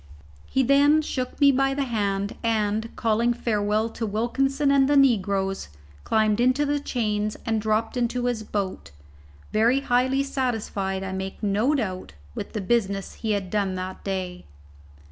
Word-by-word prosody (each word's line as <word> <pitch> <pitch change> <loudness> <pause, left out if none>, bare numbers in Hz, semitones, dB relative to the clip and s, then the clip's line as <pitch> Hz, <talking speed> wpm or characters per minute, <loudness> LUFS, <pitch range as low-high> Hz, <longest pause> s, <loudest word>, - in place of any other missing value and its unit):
He 265 - +1
then 285 +4 +4
shook 255 -4 -4
me 285 -1 +7
by 270 0 +1
the 280 - 0
hand, 205 -4 -1
and, 220 0 0
calling 230 +2 +1
a - - -13
farewell 215 -2 0
to 225 0 -4
Wilkinson 270 +7 +1
and 275 -1 +4
the 290 - +4
negroes, 195 - +2 0.3
scrambled 215 0 +2
into 255 +4 +3
the 290 0 0
chains 215 -6 -2
and 225 -2 0
dropped 215 +3 0
into 245 0 -1
his 245 -3 -1
boat, 200 - -4 0.6
very 230 +5 +3
highly 260 +1 +2
satisfied, 220 -8 -2
I 190 - -4
make 190 +2 -5
no 210 +8 +2
doubt, 185 - -3 0.2
with - - -6
the 215 - -2
business 195 -2 0
he 220 -2 -2
had 195 -3 -3
done 200 -3 0
that 185 0 -6
day. 185 -2 -4
220 Hz, 160 wpm, -25 LUFS, 200-260 Hz, 0.6 s, me